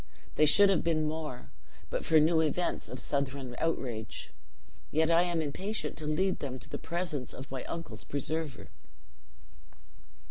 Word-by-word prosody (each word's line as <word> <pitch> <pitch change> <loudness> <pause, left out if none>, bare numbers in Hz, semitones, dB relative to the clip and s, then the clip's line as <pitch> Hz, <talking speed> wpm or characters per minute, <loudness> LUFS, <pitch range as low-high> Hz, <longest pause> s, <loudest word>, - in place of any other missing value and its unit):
They 155 - +4
should 200 +6 +8
have 190 - +2
been 155 -2 +2
more, 150 - -5 0.4
but - - -1
for 160 - +5
new 160 +1 +4
events 160 +3 0
of 125 - -6
Southron 135 -1 -2
outrage. 125 -9 -2 0.6
Yet 160 +2 +2
I 165 +1 +6
am 175 -2 +1
impatient 190 +9 -3
to 155 - -4
lead 185 +5 +1
them 130 -2 -4
to - - -14
the - - -4
presence 170 -7 -3
of 130 +1 -9
my 130 -2 -4
uncle's 140 -11 -6
preserver." 150 +1 -3
155 Hz, 150 wpm, -31 LUFS, 135-165 Hz, 0.6 s, should